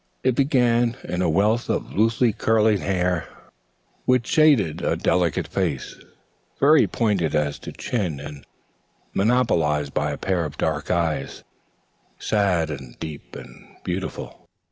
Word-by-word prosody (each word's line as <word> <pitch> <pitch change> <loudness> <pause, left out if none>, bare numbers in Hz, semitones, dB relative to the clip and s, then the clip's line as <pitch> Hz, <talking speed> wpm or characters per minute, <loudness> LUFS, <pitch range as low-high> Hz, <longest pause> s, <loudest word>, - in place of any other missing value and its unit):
It 130 - +3
began 120 -3 +2
in 90 - -3
a 90 - +2
wealth 105 +8 +1
of - - -2
loosely 115 +2 +2
curling 110 -1 +2
hair 90 -3 -1 0.8
which 125 -2 +2
shaded 135 - +3
a - - 0
delicate 85 -4 0
face, - - -2 0.6
very 150 +2 +5
pointed 100 -9 0
as 75 -1 0
to - - -8
chin 90 - -3
and 70 0 -9 0.7
monopolized 85 - +1
by 75 - 0
a 70 - -4
pair 95 -3 -1
of 75 - -6
dark 75 -2 -2
eyes, 80 -5 -1 0.7
sad 90 -7 +1
and 65 -4 -8
deep 75 -6 -8
and 60 - -13
beautiful. 90 +1 -5
95 Hz, 130 wpm, -23 LUFS, 75-115 Hz, 0.8 s, very